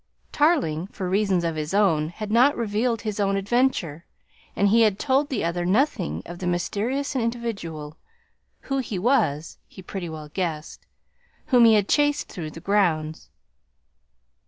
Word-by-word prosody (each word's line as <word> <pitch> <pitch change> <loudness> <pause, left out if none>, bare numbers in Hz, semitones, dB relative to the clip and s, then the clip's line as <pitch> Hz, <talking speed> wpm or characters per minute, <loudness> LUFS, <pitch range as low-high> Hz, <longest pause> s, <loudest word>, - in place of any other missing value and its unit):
Tarling 270 - +1
for 195 -2 -5
reasons 190 -2 +1
of 165 -1 -1
his 155 +4 -3
own 165 -7 +2
had 210 +4 -7
not 250 +6 +4
revealed 230 +1 -1
his 215 -2 -4
own 195 -1 +1
adventure 195 - 0 0.5
and 200 - +3
he 230 +3 +4
had 210 -3 +3
told 280 +3 +1
the 265 - -2
other 170 +1 -1
nothing 180 - 0
of 175 0 -9
the 180 - -3
mysterious 225 - -2
individual 215 - -4 0.6
(who 275 -1 -2
he 225 -6 -4
was, 180 - 0
he 190 - -13
pretty 180 -2 -6
well 155 -1 -8
guessed) 160 -3 -4 0.6
whom 245 -3 +6
he 225 -1 +6
had 205 -2 +2
chased 290 0 +1
through 165 -5 -6
the 160 - -10
grounds. 165 -5 0
200 Hz, 155 wpm, -24 LUFS, 170-235 Hz, 0.6 s, whom